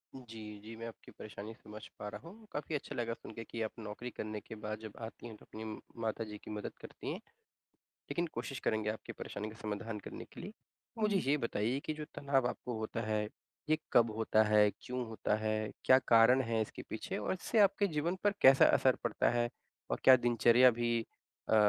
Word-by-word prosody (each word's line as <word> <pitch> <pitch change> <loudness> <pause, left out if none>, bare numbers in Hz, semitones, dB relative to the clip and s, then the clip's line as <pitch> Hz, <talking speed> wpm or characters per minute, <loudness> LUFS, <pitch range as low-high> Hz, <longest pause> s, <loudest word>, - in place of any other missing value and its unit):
जी, 110 -4 -9
जी। 110 +2 -9
मैं 115 +1 -6
आपकी 115 - -11
परेशानी 105 +1 -8
समझ 105 -1 -11 0.2
पा 105 - -5
रहा 165 - -9
हूँ। 220 +3 -14
काफ़ी 150 +1 -3
अच्छा 145 - -4
लगा 115 -2 -1
सुनके 115 0 -8
कि 115 0 -6
आप 110 - -1
नौकरी 110 +3 -6
करने 105 0 -4
के 110 - -9
बाद 105 0 -5
जब 110 -2 -8
आती 115 +1 -7
हैं 110 - -9
तो - - -18
अपनी 110 +1 -8
म 110 -1 -5 0.2
माताजी 110 -1 -3
की - - -8
मदद 105 -1 -4
करती - - -7
हैं। - - -4 0.9
लेकिन 170 +4 0
कोशिश 120 +2 -4
करेंगे 110 -1 0
आपकी 110 - -5
परेशानी 105 +1 -5
का 110 - -11
समाधान 105 +1 -4
करने - - -7
के - - -8
लिए। 210 - -7 0.5
मुझे 210 -2 +3
ये 150 - +4
बताइए 115 +1 0
कि 155 - -1
जो 150 0 -6
तनाव 135 -3 +2
आपको 120 -2 -4
होता 110 +1 -3
है, 105 -1 +1 0.5
ये 155 - +4 0.2
कब 115 -2 +6
होता 110 -1 +4
है? 105 -1 +5
क्यों 125 -1 -3
होता 110 -1 0
है? 110 0 -1
क्या 130 0 +8
कारण 115 +3 +7
है 115 -2 0
इसके 110 - -4
पीछे - - -4
और 105 - -1
इससे 215 +4 0
आपके 200 0 +5
जीवन 165 +2 0
पर 205 0 +4
कैसा 135 +1 +8
असर 130 -1 +5
पड़ता 115 -3 +2
है? 120 0 +1 0.4
और - - 0
क्या 130 - +10
दिनचर्या 120 +1 +6
भी 120 0 +1 0.5
अ, 110 - +5
115 Hz, 210 wpm, -34 LUFS, 110-130 Hz, 0.9 s, क्या